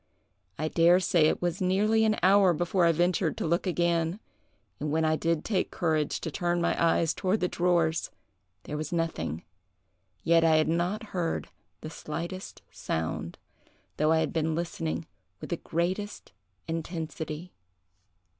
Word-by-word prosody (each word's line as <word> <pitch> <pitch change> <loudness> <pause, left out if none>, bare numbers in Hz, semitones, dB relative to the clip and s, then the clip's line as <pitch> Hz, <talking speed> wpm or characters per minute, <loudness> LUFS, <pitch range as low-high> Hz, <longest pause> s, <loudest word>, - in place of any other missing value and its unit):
I 155 - -1
dare 170 +3 +5
say 175 -4 +3
it - - -1
was 175 +1 -1
nearly 210 +4 +3
an 215 -1 +2
hour 190 -1 +6
before 175 +2 +1
I 170 - +5
ventured 175 0 +1
to - - -2
look 170 +4 0
again, 170 +1 +1 0.6
and 150 - -2
when 160 +1 +1
I 155 0 +3
did 165 0 -1
take 195 -4 0
courage 155 -3 0
to 160 - -4
turn 175 +2 0
my 170 - +1
eyes 165 -1 +3
toward 190 +3 0
the 180 - +1
drawers, 170 -3 +1 0.5
there 150 - -5
was 155 0 -4
nothing; 165 - -2 0.8
yet 165 0 +4
I 160 -1 +5
had 155 0 +3
not 175 +7 0
heard 170 -3 -2 0.3
the 155 - -7
slightest 170 +5 -6
sound, 80 0 -3 0.6
though 155 +1 +3
I 160 - +4
had - - -2
been 160 -1 0
listening 85 - -3 0.3
with - - -8
the - - 0
greatest 185 +5 -3 0.4
intensity. 165 0 -5
170 Hz, 155 wpm, -28 LUFS, 160-180 Hz, 0.8 s, hour